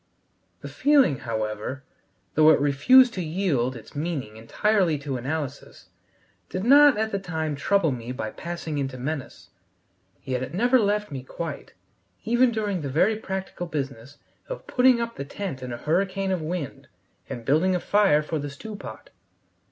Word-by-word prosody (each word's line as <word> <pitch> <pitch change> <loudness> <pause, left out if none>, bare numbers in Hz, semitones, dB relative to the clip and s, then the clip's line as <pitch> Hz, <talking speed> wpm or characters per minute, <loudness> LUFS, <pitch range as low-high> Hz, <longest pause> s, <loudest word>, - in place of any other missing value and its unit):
The - - -7
feeling, 275 - +3
however, 110 +3 -4 0.5
though 155 0 +6
it 155 - +6
refused 230 - +5
to 185 - -3
yield 155 -7 0
its 115 - -12
meaning 145 -8 -3
entirely 175 - +1
to 145 -1 -4
analysis, 140 +2 -5 0.6
did 185 - -3
not 285 +1 +7
at 220 +1 -1
the 200 - -1
time 160 -5 -3
trouble 165 +2 +2
me 120 -1 -5
by 110 -4 -4
passing 170 -3 -5
into 135 -2 -3
menace. 130 -8 -5 0.7
Yet 130 -1 -2
it 130 +5 -5
never 245 +5 +4
left 210 -3 0
me 135 -2 -5
quite, 160 +5 -7 0.5
even 240 +3 +3
during 205 -5 -2
the 140 - -4
very 185 +11 +3
practical 190 -3 -5
business 140 -3 -5 0.3
of - - -6
putting 250 -1 +4
up 235 0 -4
the - - -3
tent 140 -2 -6
in 125 -1 -6
a 120 - -4
hurricane 190 +7 0
of 185 -3 -1
wind 155 -3 -5 0.4
and 120 -2 -6
building 170 +8 +3
a - - 0
fire 195 -6 +3
for 155 +1 -3
the 145 0 -4
stew 210 +10 -8
pot. - - -10
160 Hz, 165 wpm, -25 LUFS, 135-200 Hz, 0.7 s, not